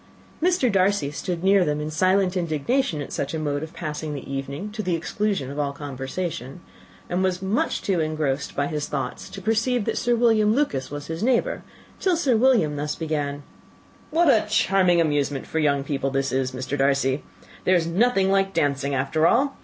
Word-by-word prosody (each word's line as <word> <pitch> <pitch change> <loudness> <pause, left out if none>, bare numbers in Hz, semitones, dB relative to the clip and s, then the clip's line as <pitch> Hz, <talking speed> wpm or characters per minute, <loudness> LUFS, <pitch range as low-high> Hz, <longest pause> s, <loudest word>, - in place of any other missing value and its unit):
Mr. 345 -8 +2
Darcy 195 -6 +2
stood 175 +3 -4
near 195 0 +5
them 150 -2 -1
in 150 +1 -4
silent 185 +3 +2
indignation 170 - 0
at - - -9
such 140 +3 -2
a - - -2
mode 145 -2 -1
of 160 0 -6
passing 150 -2 -5
the 140 - -7
evening, 140 +9 -4
to 215 +1 -4
the 180 -4 0
exclusion 165 -3 -2
of 145 - -5
all 145 -1 0
conversation, 140 +1 -5 0.5
and 180 +1 -1
was 185 -1 +1
too 190 - -7
much 200 +5 -1
engrossed 155 -6 -1
by 140 - +1
his 150 -1 -3
own - - -17
thoughts 140 -2 -4
to 195 - -8
perceive 225 +2 +1
that - - -1
Sir 240 0 +2
William 225 -2 +3
Lucas 250 - 0
was 145 0 -6
his 165 +2 -5
neighbour, 245 +1 +1 0.4
till 365 -3 +2
Sir 275 -7 +2
William 220 - +3
thus 150 0 -2
began: 145 -3 -3 0.7
"What 330 +2 +3
a 220 -6 +4
charming 190 -4 +3
amusement 145 -4 0
for 160 - -2
young 140 -2 +2
people 140 -1 -2
this 135 0 -1
is, 130 0 0
Mr. 130 +2 -4
Darcy! 135 0 +1 0.4
There 185 - +4
is 170 -2 +2
nothing 195 +2 +2
like 195 0 +1
dancing, 140 -1 0
after 150 +5 +2
all. 275 +4 +2
160 Hz, 190 wpm, -24 LUFS, 145-200 Hz, 0.7 s, near